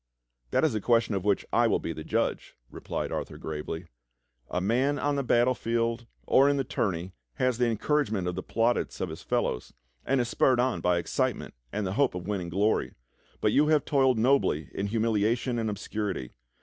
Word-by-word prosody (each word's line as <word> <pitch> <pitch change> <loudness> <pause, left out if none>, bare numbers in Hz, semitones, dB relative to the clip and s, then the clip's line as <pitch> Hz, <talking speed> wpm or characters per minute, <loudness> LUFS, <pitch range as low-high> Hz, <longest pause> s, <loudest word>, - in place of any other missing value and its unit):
"That - - +1
is - - +1
a 110 - -1
question 115 0 +2
of 95 -2 -1
which 100 -1 +1
I - - +4
will - - +2
be 85 - -4
the 80 - -7
judge," - - -1 0.2
replied - - -4
Arthur - - -4
gravely. 80 +2 -5 0.6
"A 90 - -1
man 125 +9 +1
on 145 0 0
the 140 - 0
battlefield 120 -2 +1 0.2
or 135 +2 +5
in 145 - +2
the 135 - +1
tourney 95 -8 -2 0.2
has 125 -2 0
the 125 - +4
encour 120 +6 +1
agement 100 -7 -3
of 90 - -1
the 95 - -4
plaudits 115 +5 0
of 95 - -2
his 80 - -8
fellows, 60 - -2 0.3
and 135 0 +1
is 120 - +1
spurred 125 +1 +3
on 125 0 +1
by 90 -1 +2
excitement 85 - -1 0.2
and 105 - -2
the 95 - -2
hope 135 -2 +2
of 90 -1 -5
winning 95 -4 -2
glory, 100 +5 0 0.5
but - - +3
you 150 +2 +4
have 155 -2 +3
toiled 135 -4 +3
nobly 115 - +2
in 100 - -2
humilia 110 +1 +1
tion 120 -1 -2
and 110 -1 -1
obscurity. 100 - -4
115 Hz, 200 wpm, -28 LUFS, 95-125 Hz, 0.6 s, or